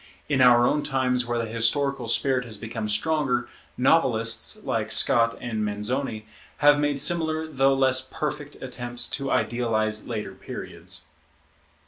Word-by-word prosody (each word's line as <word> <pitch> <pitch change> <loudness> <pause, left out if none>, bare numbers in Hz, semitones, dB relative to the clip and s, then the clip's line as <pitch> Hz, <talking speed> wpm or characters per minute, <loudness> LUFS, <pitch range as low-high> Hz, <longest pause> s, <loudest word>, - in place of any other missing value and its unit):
In 140 -3 +1
our 120 -1 +6
own 150 - +1
times 130 -4 0
where 120 0 -1
the 115 - -1
historical 120 +3 0
spirit 130 +2 +1
has 110 -3 -7
become 110 0 -5
stronger, 125 +1 0 0.3
novelists, 125 - +2
like 110 -1 -2
Scott 115 -3 +4
and 110 -3 -3
Manzoni, 110 +2 -3 0.3
have 145 0 +5
made 145 -1 0
similar 160 0 0
though 135 -3 +2
less 130 -1 +4
perfect 150 -2 -4
attempts 120 -2 -1
to 135 -1 -2
idealize 110 -4 0
later 105 -4 -5
periods. 95 - -8
125 Hz, 135 wpm, -25 LUFS, 115-140 Hz, 0.3 s, our